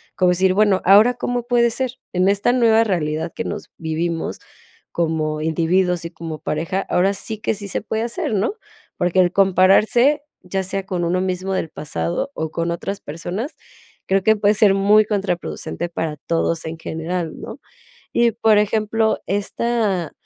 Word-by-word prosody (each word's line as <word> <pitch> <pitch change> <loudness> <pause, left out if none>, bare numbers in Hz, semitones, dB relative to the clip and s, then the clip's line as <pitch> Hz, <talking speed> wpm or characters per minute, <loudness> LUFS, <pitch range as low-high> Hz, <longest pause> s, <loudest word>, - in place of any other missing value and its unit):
Como 180 -1 +3
decir: 185 +1 +2
"Bueno, 200 -1 +3
¿ahora 210 +6 +7
cómo 245 0 -2
puede 240 -1 +3
ser? 255 +1 -2 0.2
En 180 +1 +2
esta 200 +4 +2
nueva 225 -3 +4
realidad 160 -6 -1
que 230 - -4
nos 205 0 -6
vivimos 165 +1 -3 0.5
como 155 -2 -1
individuos 170 +2 +1
y 170 - -5
como 165 -2 -7
pareja, 165 +5 -2
ahora 190 +3 +2
sí 200 +2 -5
que 215 - 0
sí 205 0 -7
se - - -1
puede 220 +1 -3
hacer", 235 -1 -2
¿no?, 205 - 0 0.4
porque 175 +1 +1
el 175 -1 +2
compararse, 200 +9 +4 0.2
ya 190 +1 -2
sea 190 +1 -3
con 180 -2 -2
uno 180 +2 0
mismo 185 +1 -2
del 175 -3 -2
pasado 85 - -3
o 160 -1 -3
con 170 +1 -2
otras 195 +4 -4
personas, 175 - -5 0.5
creo 195 0 +2
que 220 +2 +4
puede 205 0 +3
ser 205 -2 +5
muy 205 +2 +5
contraproducente 185 -4 -3
para 160 -2 -3
todos 165 +2 -1
en 160 +1 -5
general, 165 +1 -4
¿no? - - -8 0.6
Y 235 0 +4
por 220 -1 +3
ejemplo, 220 +1 +1
esta, 205 -3 -1
190 Hz, 165 wpm, -20 LUFS, 170-215 Hz, 0.6 s, ahora